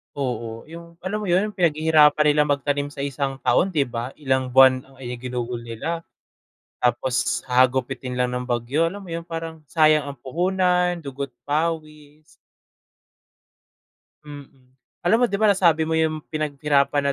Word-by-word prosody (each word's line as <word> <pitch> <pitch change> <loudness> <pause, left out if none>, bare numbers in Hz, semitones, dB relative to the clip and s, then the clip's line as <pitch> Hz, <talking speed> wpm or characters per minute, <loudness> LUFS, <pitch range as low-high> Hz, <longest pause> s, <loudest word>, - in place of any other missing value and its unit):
Oo, 120 -4 -4
yung 170 0 -11
alam 200 +3 -2
mo 210 - -5
'yon? 190 +4 +2
Yung 205 - -20
pinaghihirapan 155 -2 +4
nila 150 0 +3
magtanim 145 0 0
sa 145 -1 -7
1 140 -1 -2
taon 185 -1 +2
di 145 - +3
ba? 120 0 -5
Ilang 130 -3 -1
buwan 130 -1 +7
ang 135 -1 -17 0.2
ginugol 125 -1 -4
nila 120 +9 -5 0.7
tapos 120 -1 0
hahagupitin 125 0 +1
lang 125 0 0
ng 125 0 -4
bagyo, 125 +7 0
alam 200 +3 -7
mo 175 - -10
'yon? 165 +1 -5
Parang 165 -1 -6
sayang 155 -2 +3
ang 140 - -6
puhunan, 180 +4 0
dugo't 140 -2 -6
pawis. 155 -1 -3 2.0
Mm. 135 -3 -13 0.3
Alam 185 +6 +4
mo - - +5
di 200 - -1
ba, 215 - 0
nasabi 165 -4 +3
mo 160 - -3
yung 160 -1 0
pinaghirapan 145 -1 +1
145 Hz, 145 wpm, -23 LUFS, 130-165 Hz, 2.0 s, buwan